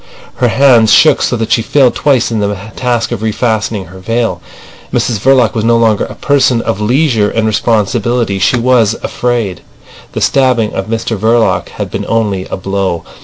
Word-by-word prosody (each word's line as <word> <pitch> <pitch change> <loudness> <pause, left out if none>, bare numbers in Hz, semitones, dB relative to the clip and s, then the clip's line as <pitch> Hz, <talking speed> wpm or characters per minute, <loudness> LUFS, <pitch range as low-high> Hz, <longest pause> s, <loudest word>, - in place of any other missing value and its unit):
Her 125 - +2
hands 120 -3 +4
shook 155 - +5
so 120 - 0
that 115 -1 -3
she - - +3
failed 130 +2 +2
twice 135 -5 +1
in 110 - -1
the 100 -1 -2 0.2
task 120 -2 -1
of - - -3
refastening 110 -2 -2
her 95 +1 -12
veil. 115 -3 -2 0.5
Mrs 115 -4 -1
Verloc 125 0 +3
was 110 - -2
no 115 +1 +3
longer 110 -3 +1
a - - -10
person 135 -4 +1
of 110 -2 -3
leisure 120 -2 +1
and 115 0 -1
responsibility. 110 0 0
She 95 +6 +2
was 115 -3 +2
afraid. 115 -8 -2 0.5
The - - -4
stabbing 125 -5 +1
of 95 - -4
Mr 115 0 -2
Verloc 115 +2 +1
had - - -6
been - - -4
only 105 -5 -1
a - - -5
blow. 95 -2 -3
115 Hz, 175 wpm, -12 LUFS, 105-120 Hz, 0.5 s, shook